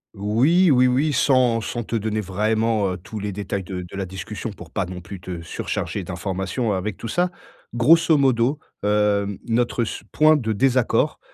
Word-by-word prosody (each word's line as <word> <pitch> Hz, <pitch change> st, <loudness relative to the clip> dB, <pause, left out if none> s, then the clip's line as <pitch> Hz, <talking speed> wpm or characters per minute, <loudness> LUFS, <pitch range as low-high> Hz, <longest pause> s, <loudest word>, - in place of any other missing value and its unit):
Oui, 135 Hz, -, +3 dB
oui, 125 Hz, -1 st, +5 dB
oui, 140 Hz, +5 st, +2 dB
sans 130 Hz, -4 st, +3 dB
sans 120 Hz, +1 st, -4 dB
te 115 Hz, -, -4 dB
donner 110 Hz, 0 st, -1 dB
vraiment 105 Hz, 0 st, 0 dB
tous 105 Hz, +4 st, -8 dB
les 100 Hz, 0 st, -3 dB
détails 100 Hz, -1 st, -3 dB
de 90 Hz, -1 st, -5 dB
de 90 Hz, +2 st, -10 dB
la 95 Hz, -, -2 dB
discussion 95 Hz, +5 st, -6 dB
pour 90 Hz, -4 st, -12 dB
pas 95 Hz, -, -1 dB
non 90 Hz, -1 st, -7 dB
plus 95 Hz, +1 st, -9 dB
te 90 Hz, -2 st, -6 dB
surcharger 95 Hz, +3 st, -4 dB
d'informations 95 Hz, +5 st, -3 dB
avec 95 Hz, +1 st, -2 dB
tout 115 Hz, -, -6 dB
ça. 180 Hz, +5 st, +1 dB, 0.4 s
Grosso 160 Hz, +6 st, +5 dB
modo, 130 Hz, +1 st, +2 dB, 0.3 s
hem, 105 Hz, -1 st, +1 dB
notre 120 Hz, +1 st, +1 dB
su 110 Hz, -, -6 dB
point 155 Hz, +1 st, +4 dB
de 110 Hz, -5 st, -1 dB
désaccord, 130 Hz, +2 st, +2 dB
110 Hz, 175 wpm, -22 LUFS, 95-125 Hz, 0.4 s, oui